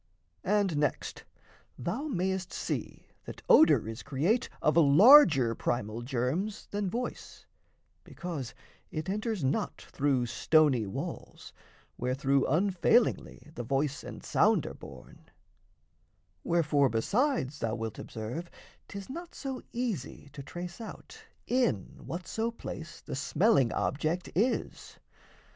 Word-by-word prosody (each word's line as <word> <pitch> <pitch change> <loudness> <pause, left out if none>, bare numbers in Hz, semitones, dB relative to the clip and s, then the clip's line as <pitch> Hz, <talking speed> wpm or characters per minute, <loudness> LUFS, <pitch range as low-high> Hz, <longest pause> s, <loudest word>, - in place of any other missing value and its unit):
And 200 -5 +1
next, 145 0 -2 0.5
Thou 225 - -3
mayest 190 - -2
see - - -4 0.2
that - - -9
odour 315 - +6
is 115 +2 -6
create 170 - 0
Of 155 - +2
larger 160 - +7
primal 115 -1 -2
germs 135 - -2
than 205 -1 -1
voice, 245 +6 -5 0.6
because 150 -8 -6 0.3
It 155 +4 -4
enters 215 - -2
not 135 +2 -1
through 135 -3 0
stony 135 -3 +3
walls, 95 - -7 0.5
wherethrough 135 +2 +1
Unfailingly 180 - +1
the 120 - -5
voice 135 +4 -1
and - - -9
sound - - +3
are - - -5
borne; - - -13 1.1
Wherefore, 150 -5 +2
besides, 155 - 0
thou 115 -1 -1
wilt 115 -2 -5
observe 120 +11 -6 0.4
'tis 200 -1 -8
not 340 +5 -8
So 265 -2 -5
easy 220 - -4
to 145 - -7
trace 175 - -7
out 225 - -10 0.2
in 240 - 0
whatso 185 +7 -3
place 170 -8 -8
The - - -6
smelling 145 - +2
object 160 +5 -1
is. 225 +8 -1
160 Hz, 115 wpm, -30 LUFS, 130-205 Hz, 1.1 s, larger